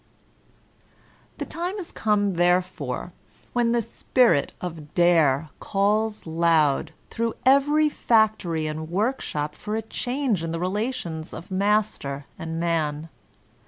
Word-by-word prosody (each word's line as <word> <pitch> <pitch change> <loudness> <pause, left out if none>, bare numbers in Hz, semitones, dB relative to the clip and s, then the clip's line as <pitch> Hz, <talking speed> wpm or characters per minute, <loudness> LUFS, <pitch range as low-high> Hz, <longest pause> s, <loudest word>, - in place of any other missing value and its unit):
The - - -4
time 355 +3 -3
is 370 -4 -5
come 205 -2 +1
therefore 180 +1 0 0.4
when 240 -1 +2
the 235 -1 +2
spirit 230 - +2
of 160 -4 -7
Dare 160 -4 +3
calls 210 +2 0
loud 160 -2 +2 0.2
through 230 0 -1
every 290 +3 +5
factory 220 - +2
and 155 +1 -4
work 215 +9 0
shop 150 0 -3
for 210 0 -5
a 225 - -1
change 245 - -1
in 165 - -3
the 165 - -3
relations 185 -4 -3
of 170 +4 -10
master 195 -8 0
and 165 0 -4
man. 160 -2 -1
185 Hz, 125 wpm, -25 LUFS, 160-225 Hz, 0.4 s, every